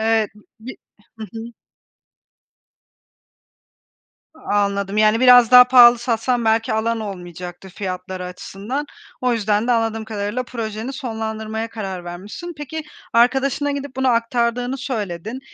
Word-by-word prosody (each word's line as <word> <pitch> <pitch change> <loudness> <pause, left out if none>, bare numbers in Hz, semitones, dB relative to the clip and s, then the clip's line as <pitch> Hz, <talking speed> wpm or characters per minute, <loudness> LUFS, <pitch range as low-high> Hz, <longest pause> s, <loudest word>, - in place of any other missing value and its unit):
Evet. 220 -1 +1 0.3
Bi 250 +4 -9 0.4
Hı 220 - -5
hı. 225 - -6 2.9
Anladım. 200 -6 -1
Yani, 215 +1 +4
biraz 245 -2 +7
daha 250 0 +11
pahalı 245 -1 +7
satsan 240 0 -1
belki 225 +1 +2
alan 225 +1 0
olmayacaktı 180 -2 -8
fiyatları 185 -1 -5
açısından. 200 +9 -5 0.4
O 250 -1 +2
yüzden 215 0 0
de 245 - +3
anladığım 225 -1 0
kadarıyla 215 +3 -3
projeni 230 0 -5
sonlandırmaya 220 -3 -4
karar 195 -5 -6
vermişsin. 200 - -8
Peki, 300 +2 -6 0.3
arkadaşına 270 +4 +2
gidip 280 -2 -5
bunu 265 0 0
aktardığını 240 +1 0
söyledin. 220 - -4
225 Hz, 115 wpm, -20 LUFS, 205-250 Hz, 2.9 s, daha